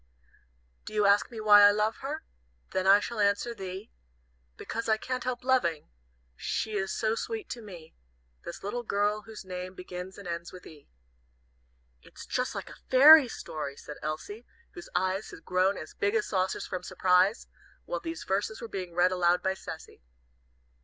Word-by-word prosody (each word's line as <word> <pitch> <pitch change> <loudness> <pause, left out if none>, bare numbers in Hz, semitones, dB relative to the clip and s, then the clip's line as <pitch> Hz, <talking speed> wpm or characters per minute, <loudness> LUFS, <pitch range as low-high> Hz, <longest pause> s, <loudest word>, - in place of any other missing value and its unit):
"Do 215 - -9
you 210 -1 +3
ask 200 +1 +4
me 230 - -8
why 210 -1 +7
I 205 - +9
love 210 +2 +1
her? 300 +4 -5 0.5
Then 185 0 0
I 200 +1 +8
shall 235 +1 -5
answer 205 +3 +1
thee, 190 0 -7 0.7
Because 230 0 -4
I 220 - +4
can't 255 +3 -4
help 250 -1 -3
loving, 240 - +1 0.4
She 220 - -2
is 195 -1 -1
so 220 -1 0
sweet 440 - -4
to 240 - -6
me, 175 -7 -11 0.5
This 170 - -8
little 225 +5 -3
girl 210 -1 0
whose 220 -3 -9
name 185 0 -6
begins 180 +1 -8
and 200 -3 -9
ends 170 0 -5
with 180 - -12
'E.'" 150 -3 -14 1.1
"It's - - -12
just - - -2
like - - -6
a - - -13
fairy 285 +2 +9
story," 150 -10 -6
said 150 - -9
Elsie, 160 +10 -5 0.2
whose 350 - -11
eyes 190 +2 0
had - - -12
grown 185 +2 +2
as 155 - -8
big 205 +2 0
as 215 - +2
saucers 185 -2 -1
from 185 - -4
surprise, 185 +4 +2 0.4
while - - -3
these 330 -1 -6
verses 205 +3 -1
were 230 - -6
being 185 -5 -6
read 180 +1 +4
aloud 180 -1 +2
by 190 - +1
Cecy. 160 - -10
200 Hz, 175 wpm, -29 LUFS, 180-225 Hz, 1.1 s, I